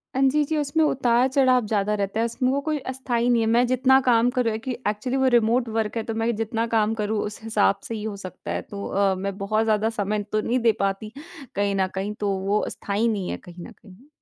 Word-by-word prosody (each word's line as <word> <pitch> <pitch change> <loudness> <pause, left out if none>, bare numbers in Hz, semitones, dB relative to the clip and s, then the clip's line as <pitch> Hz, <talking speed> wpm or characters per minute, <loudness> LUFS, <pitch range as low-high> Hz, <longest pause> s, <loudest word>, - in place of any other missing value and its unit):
हाँ 265 - +1
जी, 300 +2 +2
जी। 315 +2 -1
उसमें 300 +2 +1
उतार-चढ़ाव 255 -2 +3
ज़्यादा 210 -1 0
रहता 200 +2 -2
है, 230 - +2
उसमें 245 +2 -1
वो 280 - +1
कोई 310 - +1
अस्थाई 245 -2 -1
नहीं 235 -2 +3
है 220 - +1
मैं 235 +2 +4
जितना 255 +1 +4
काम 240 -1 +3
करूँ 235 -3 +2
है 215 - -2
कि - - 0 0.2
एक्चुअली 215 +6 -1
वो 265 - +3
रिमोट 235 +1 +2
वर्क़ 220 0 -2
है 225 - -1
तो 225 - -4
मैं 230 0 0
जितना 225 +1 -1
काम 220 -1 +1
करूँ 210 0 -1
उस 210 +1 -7
हिसाब 210 -3 +2
से 230 - -4
ही 210 - -5
हो 215 -2 -4
सकता 185 -2 -8
है। - - -2
तो 200 -1 -8
अ, 195 -1 +1
मैं 195 +1 -4
बहुत 215 +2 0
ज़्यादा 220 0 +1
समय 210 -1 -2
तो 215 0 +1
नहीं 245 +4 0
दे 230 -1 +4
पाती 195 +2 -2 0.4
कहीं 200 0 0
न 190 -1 +1
कहीं 200 +2 -2
तो 205 -1 0 0.2
वो 210 +1 +1
स्थायी 205 +3 -1
नहीं 200 -5 -1
है - - -3
कहीं 175 -1 -12
न - - -12
कहीं। 215 +4 -18
225 Hz, 245 wpm, -24 LUFS, 205-245 Hz, 0.4 s, मैं